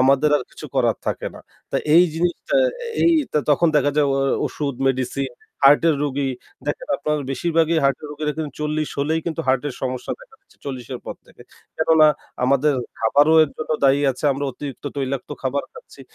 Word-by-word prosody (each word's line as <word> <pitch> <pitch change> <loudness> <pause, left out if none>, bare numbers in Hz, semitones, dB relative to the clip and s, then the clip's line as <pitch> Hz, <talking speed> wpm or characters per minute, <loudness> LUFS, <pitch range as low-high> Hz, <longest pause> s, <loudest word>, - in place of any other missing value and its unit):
আমাদের 140 +3 +4
আর 135 - -3
কিছু - - -10
করার - - +2
থাকে - - -2
না। - - -11 0.3
তা - - 0 0.2
এই 175 +2 +8
জিনিসটা 175 - -1 0.5
এই 335 - +5 0.2
ত - - -23 0.2
তখন 155 +4 +4
দেখা 145 0 +3
যায় 150 -1 +4
ও - - 0 0.3
ওষুধ 140 -3 -3
মেডিসিন, 130 +1 -1 0.3
হার্টের 150 +3 +6
রোগী 140 -1 -1 0.4
দেখেন - - -3
আপনারা 150 0 -1
বেশিরভাগই 165 +4 +1
হার্টের 140 +2 +1
রোগীর 150 +1 -4
এখানে 155 -1 -4
৪০ 150 0 -1
হলেই 160 +3 +1
কিন্তু 165 -1 -2
হার্টের 135 +1 +1
সমস্যা 130 -1 -3
দেখা - - -17
দিচ্ছে 395 - -27
৪০ 130 -4 -6
এর 125 - -7
পর - - -5
থেকে। - - -17 0.3
কেননা 160 -1 +5 0.4
আমাদের 140 +3 +3 0.2
খাবারও 145 +8 +4
এর 145 - -8
জন্য 155 - -6
দায়ী 135 +1 +5
আছে। 130 +3 -7
আমরা 140 +1 -3
অতিরিক্ত 140 +2 -8
তৈলাক্ত 135 -1 -3
খাবার 135 +2 -1
খাচ্ছি। - - -14
145 Hz, 180 wpm, -21 LUFS, 135-160 Hz, 0.5 s, এই